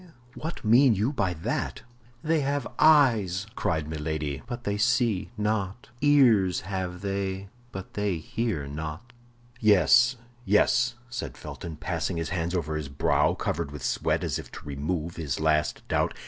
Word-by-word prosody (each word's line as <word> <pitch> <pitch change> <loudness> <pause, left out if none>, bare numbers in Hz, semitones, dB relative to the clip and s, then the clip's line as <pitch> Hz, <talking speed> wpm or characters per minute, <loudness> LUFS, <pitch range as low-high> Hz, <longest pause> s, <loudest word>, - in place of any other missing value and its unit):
what 160 -4 -6
mean 120 +2 +6
you 110 +9 0
by 100 -9 0
that?" 80 -2 -3 0.4
"They 160 0 +2
have 140 -2 -1
eyes," 115 - +4
cried 80 -2 -1
Milady, 75 -2 -3
"but 120 -1 -6
they 100 -2 -1
see 110 -2 +1
not; 105 +3 -2
ears 120 -11 +4
have 90 -1 -4
they, 95 -1 -3 0.2
but 95 0 -8
they 105 -4 -1
hear 90 -1 -2
not." 80 +10 -6 0.5
"Yes, 120 +4 +5 0.3
yes!" 120 +4 +3
said 120 0 -6
Felton, 80 -2 -7
passing 85 +2 -2
his 80 -1 -2
hands 85 0 -2
over 80 -3 -1
his 75 -2 -5
brow, 70 - +2
covered - - -2
with 70 -2 -8
sweat, - - 0
as - - -1
if - - -10
to - - -10
remove 75 +4 -3
his 75 -5 -3
last 75 -2 +1
doubt. - - 0
95 Hz, 150 wpm, -27 LUFS, 80-120 Hz, 0.5 s, mean